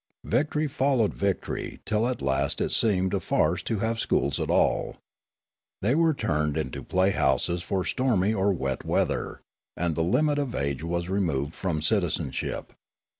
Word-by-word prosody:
Victory 150 +6 +1
followed 130 -5 +1
victory 100 -2 -2
till 110 +2 +1
at 125 - -3
last 65 0 0
it - - 0
seemed 95 -4 +2
a - - +2
farce - - +1
to 110 - -2
have 115 0 -1
schools 70 - +1
at - - -2
all. - - +1 0.9
They 115 +6 +3
were 160 0 +3
turned 75 - 0
into 75 -5 -3
playhouses 90 -2 +1
for 90 +1 -2
stormy 110 -6 +1
or 100 -1 +2
wet 65 -8 -2
weather, - - -1 0.4
and 85 -1 0
the 80 - -1
limit 145 - +2
of 140 -4 -2
age 70 +1 -2
was 85 +1 -2
removed 80 -7 -1
from 85 -5 -2
citizenship. 85 - -1
95 Hz, 155 wpm, -27 LUFS, 80-115 Hz, 0.9 s, They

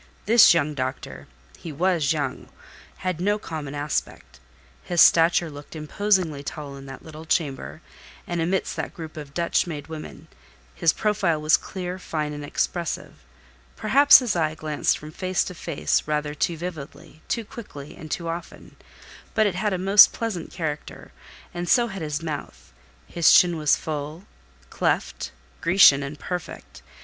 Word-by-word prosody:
This 220 -4 +7
young 150 -2 +1
doctor 130 -1 -5 0.3
(he 165 - -7
was 165 -1 +1
young) 155 -2 -3 0.6
had 180 -2 -1
no 205 +3 +2
common 155 -7 -6
aspect. 145 - -4 0.4
His 175 -1 -2
stature 165 0 +5
looked 145 +2 -11
imposingly 160 -1 0
tall 140 -1 -7
in 135 0 -11
that 135 -1 -10
little 155 0 -10
chamber, 155 -1 -2 0.4
and 175 -1 -2
amidst 185 +4 -1
that - - -5
group 160 -3 -8
of 150 -2 -9
Dutch 170 +1 +1
made 150 -4 -6
women; 155 -1 -9 0.5
his 165 - +3
profile 205 -7 0
was 155 +1 +4
clear, 180 -1 -5
fine 150 -4 -3
and 145 0 -7
expressive: 170 +3 -3 0.6
perhaps 285 +1 +7
his 245 -6 -1
eye 155 -2 0
glanced 155 -1 0
from 150 +1 -10
face 185 +2 -1
to 180 - -7
face 165 -3 -1
rather 150 -1 -1
too 165 +2 -1
vividly, 155 -2 -8
too 230 -2 -2
quickly, 200 - -10
and 155 -3 -10
too 170 +2 -3
often; 165 +1 -7 0.6
but 220 - +4
it 205 - +1
had 205 +4 -1
a 190 - 0
most 195 +3 +7
pleasant 220 -8 -4
character, 155 -4 -6 0.4
and 175 0 -4
so 240 -2 +4
had 195 -3 -7
his 150 0 -3
mouth; 155 -3 -7 0.3
his 170 -2 +3
chin 175 -1 +6
was 150 -2 +3
full, 155 +4 -6 0.5
cleft, - - -1 0.3
Grecian, 165 -4 +6
and 140 +2 -6
perfect. 180 +3 -7
165 Hz, 155 wpm, -24 LUFS, 150-180 Hz, 0.6 s, This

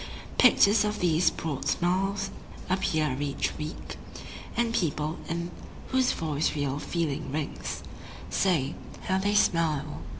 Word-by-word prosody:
Pictures 220 -4 +6
of 210 0 -1
these 175 0 +4
broad 140 -4 -4
smiles 195 +4 +1 0.4
appear 155 -7 +1
each 145 -1 -1
week, 150 +1 -6 0.6
And 235 -1 +2
people 155 -4 0
in 170 +1 -2 0.4
whose 260 -1 +3
voice 155 -2 0
real 145 -1 -1
feeling 155 -5 -2
rings 150 0 -3 0.5
Say: 160 -7 +2 0.3
How 190 0 +1
they 205 +2 +1
smile! 155 -6 +2
165 Hz, 120 wpm, -28 LUFS, 150-195 Hz, 0.6 s, Pictures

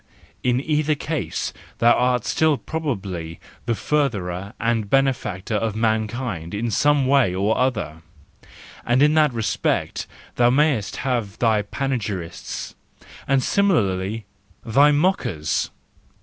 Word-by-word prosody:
—in 125 0 +2
either 150 +1 +1
case 145 - -3 0.2
thou 120 +1 +5
art 125 -2 +1
still 155 -2 +2
probably 95 - -4 0.3
the 115 - +1
furtherer 100 -10 -1
and 115 -3 0
benefactor 125 -7 0
of 110 0 0
mankind 110 -5 -1
in 115 +2 -2
some 145 +3 +3
way 130 -9 +3
or 100 +4 +1
other, 105 -11 -1 0.8
and 120 +4 +3
in 150 +1 +5
that 155 -2 +4
respect 115 -3 -1 0.3
thou 120 0 +5
mayest 130 -6 +2
have 120 -7 -1
thy 110 -3 +2
panegyrists—and 110 +3 -4
similarly 110 - +1 0.4
thy 140 +6 +5
mockers 145 - 0
120 Hz, 110 wpm, -22 LUFS, 100-140 Hz, 0.8 s, thou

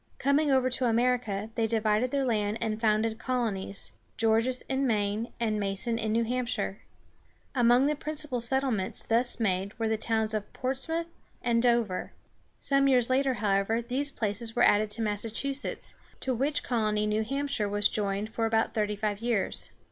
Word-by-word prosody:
Coming 285 +2 +2
over 260 -2 +3
to 255 +1 0
America, 230 -3 0
they 225 0 0
divided 220 +2 +1
their 275 0 0
land 210 -3 0
and 220 0 -2
founded 220 0 +1
colonies, 220 -6 -1 0.3
Gorges 230 +3 +2
in 270 0 -1
Maine 210 0 0
and 215 -2 0
Mason 205 +4 0
in 220 -1 -1
New 230 +1 +2
Hamp´shire. 250 +1 -2 0.8
Among 245 0 +4
the 300 +1 +1
principal 300 -3 -3
settlements 235 -5 0
thus 240 +2 +2
made 195 -2 -1
were 225 -1 0
the 220 0 +1
towns 220 -1 0
of 210 -1 -3
Ports´moŭth 275 +6 -2 0.4
and 235 -1 +2
Dover. 235 -6 +1 0.4
Some 275 0 +3
years 255 -2 +4
later, 265 0 +2
however, 205 +1 +1
these 255 +5 0
places 225 -2 -2
were - - +3
added 210 +1 +4
to 225 +2 -3
Massachusetts, 225 +6 -2 0.3
to 260 - 0
which 275 +5 0
colony 215 -3 0
New 210 +1 +1
Hampshire 275 -4 -1
was 205 0 +3
joined 205 +1 -2
for 225 -1 0
about 225 0 +1
thirty 210 -1 0
five 205 -1 -2
years. 230 -4 0
230 Hz, 165 wpm, -28 LUFS, 215-255 Hz, 0.8 s, Among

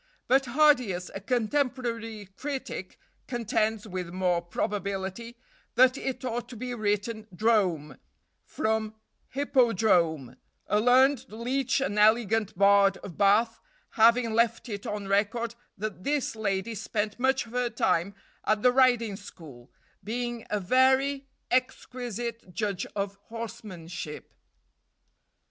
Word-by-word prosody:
But 265 +1 +3
Hardius, 245 -10 +3
a 195 - -6
contemporary 230 -3 -2
critic, 270 -9 -5 0.3
contends, 220 -3 -1
with 185 -3 -5
more 180 -1 0
probability, 200 +5 -4 0.4
that 255 +2 +6
it 265 -1 -4
ought 240 0 -3
to 250 - -9
be 250 +2 -5
written 215 0 -2
Drome, 180 - +1 0.4
from 220 0 -2 0.3
hippodrome; 205 - +2 0.3
a 210 - +1
learned 255 +3 +4
leech 255 +5 -1
and 210 -6 -1
elegant 220 -2 +3
bard 200 0 +5
of 180 -5 -8
Bath 215 +5 +3 0.3
having 230 0 +4
left 230 +2 +1
it 200 -2 -5
on 205 -1 -4
record 215 +4 0 0.2
that 200 -2 -5
this 285 -3 -1
lady 200 0 -2
spent 210 +1 -3
much 265 0 +2
of 230 - -14
her 250 0 0
time 200 -4 0 0.3
at 215 0 +1
the 250 - +6
riding 245 -5 +3
school, 145 - -13 0.3
being 240 +1 -4
a 210 - 0
very 265 +6 +2 0.2
exquisite 240 -4 -2
judge 200 -4 -2
of 200 -1 -3
horsemanship. 210 -9 -7
220 Hz, 120 wpm, -28 LUFS, 200-245 Hz, 0.4 s, that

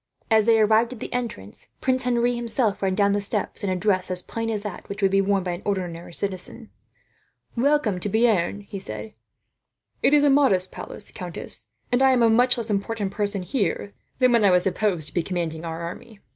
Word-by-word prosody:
As 220 -1 +5
they 225 -1 +5
arrived 220 +3 +3
at 240 - -11
the - - -6
entrance, 230 - -5
Prince 255 -1 0
Henri 240 0 +2
himself 235 -2 -1
ran 190 -1 +1
down 200 +1 +3
the 205 0 +1
steps, 200 +1 -1
in 200 - 0
a 185 - 0
dress 185 0 +1
as 180 0 -2
plain 230 0 -4
as 210 -2 -2
that 205 -4 -7
which 200 0 -5
would 195 - +4
be 195 0 +4
worn 195 -1 +1
by 180 - -2
an 175 +2 -5
ordinary 175 -4 -3
citizen. 195 +5 -4 0.8
"Welcome 255 -6 +2
to 205 - -1
Bearn," 205 -3 +2
he 200 0 -8
said. 110 - -7 0.9
"It 290 - +4
is 290 - +4
a 290 - +5
modest 200 -10 +3
palace, 205 - -6
countess; 165 - -4 0.2
and 245 +1 +2
I 265 0 +6
am 245 -2 +3
a 225 - +5
much 245 +2 +4
less 225 -2 -2
important 200 0 -2
person, 200 -2 -1
here, 200 0 -2 0.2
than 255 -1 +4
when 235 -2 +4
I 200 - +6
was 180 -1 +4
supposed 185 -5 0
to - - -22
be 175 - +1
commanding 165 -2 -3
our 165 0 -5
army." 200 +5 -8
205 Hz, 215 wpm, -24 LUFS, 185-230 Hz, 0.9 s, I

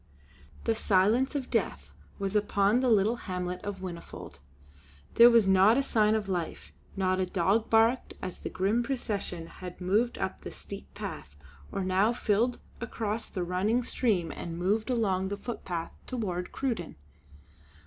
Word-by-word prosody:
The 230 - +2
silence 220 +7 +2
of 270 -3 -3
death - - -1 0.3
was 195 0 -3
upon 205 +2 +3
the 255 -1 +2
little 220 +2 +3
hamlet 180 -3 -4
of 200 -2 -5
Whinnyfold. 90 - -8 0.7
There 235 +1 +9
was 230 -4 +5
not 190 +5 +6
a 275 - +2
sign 215 -4 +3
of 215 -2 -2
life; 175 -4 -4 0.2
not 185 -1 +1
a 185 - +2
dog 195 +5 +1
barked 225 +3 +3
as 185 - -6
the - - -5
grim 200 +6 +1
procession 210 -9 -3
had 180 +1 -9
moved 210 +7 +1
up 190 - -3
the - - -6
steep 65 - -10
path 70 - -7 0.4
or 195 - -2
now 190 +5 +2
filed 235 +2 +1 0.2
across 225 -2 -3
the 185 - -3
running 195 +8 +1
stream 200 -9 0
and 165 -1 -6
moved 205 +7 0
along 195 -6 +1
the 200 +1 -3
footpath 185 -7 -5
toward 185 -8 -3
Cruden. 230 -11 -3
200 Hz, 155 wpm, -29 LUFS, 185-230 Hz, 0.7 s, There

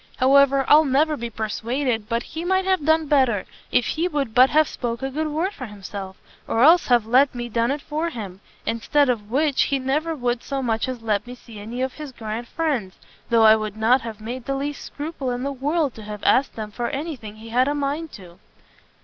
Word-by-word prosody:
however, 275 +1 +4
I'll 305 +1 +7
never 300 +2 +2
be 235 -4 -5
persuaded 225 +1 -2
but 235 +1 0
he 325 - -6
might 375 +1 +1
have 375 -5 +1
done 315 +1 +3
better, 260 -9 +2 0.3
if 245 - +3
he 330 +3 0
would 280 -9 -2
but 255 +2 +6
have 310 0 +4
spoke 235 0 -4
a 270 - -2
good 310 +3 -2
word 325 +7 -1
for 255 -9 -7
himself, 195 -2 -8 0.3
or 225 - +2
else 335 +4 +6
have 240 -3 +3
let 255 +4 +3
me 240 0 -4
done 230 +1 +1
it 285 +1 -2
for 315 +3 -2
him; 200 - -8 0.2
instead 275 +5 +1
of 215 -4 -1
which, 280 +3 +2
he 275 - 0
never 300 +5 -1
would 245 -3 -1
so 275 -1 -3
much 225 -1 0
as 245 -3 -6
let 210 0 0
me 250 - -8
see 230 -3 -13
any 235 +5 -4
of 260 -1 -2
his 300 -3 -8
grand 230 0 -6
friends, 270 - -2 0.3
though 230 -2 +4
I 220 0 +8
would 215 -1 -4
not 235 +4 +3
have 225 -2 -7
made 235 +3 -6
the 275 - -1
least 285 +1 -4
scruple 290 -3 -5
in 245 0 -3
the 280 - -2
world 285 +1 0
to 220 - -11
have 210 -1 -8
asked 270 - +3
them 215 -1 -6
for 240 +3 -3
any 300 +3 -4
thing 215 -4 -10
he 220 +1 -11
had 250 +3 +2
a 290 - 0
mind 290 +3 -2
to." 180 -4 -13
255 Hz, 225 wpm, -23 LUFS, 225-290 Hz, 0.3 s, I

